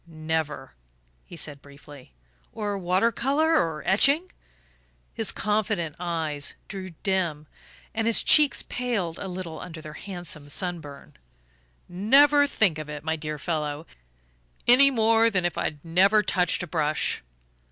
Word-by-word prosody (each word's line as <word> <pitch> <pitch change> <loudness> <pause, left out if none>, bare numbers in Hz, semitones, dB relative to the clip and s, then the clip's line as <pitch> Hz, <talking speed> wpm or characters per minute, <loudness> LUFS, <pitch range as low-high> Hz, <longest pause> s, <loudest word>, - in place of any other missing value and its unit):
"Never," 155 - -4 0.5
he - - -11
said 145 -3 -5
briefly. 140 - -15 0.4
"Or 205 -2 -3
water 190 +4 +1
colour 285 +8 +1
or 160 - 0
etching?" 285 - +3 0.8
His - - 0
confident 205 -6 -1
eyes 160 -5 -2
grew 185 -3 -7
dim, 175 -6 -1 0.5
and 225 0 -1
his 230 - +3
cheeks 300 -2 +5
paled 215 -10 -3
a 195 - -5
little 180 -3 -6
under 165 -3 -8
their 155 -1 -9
handsome 175 -7 -7
sunburn. 155 -4 -3 0.7
"Never 280 +10 +4
think 190 - +1
of 155 -1 -7
it, 150 -1 -7
my 160 0 -1
dear 155 -1 -5
fellow 150 0 -3 0.8
any 265 +3 +7
more 225 -2 +3
than 185 -5 -1
if 175 - -1
I'd 150 -1 -4
never 195 +6 +4
touched 180 -2 0
a - - -6
brush." 155 -2 -1
175 Hz, 135 wpm, -25 LUFS, 155-215 Hz, 0.8 s, any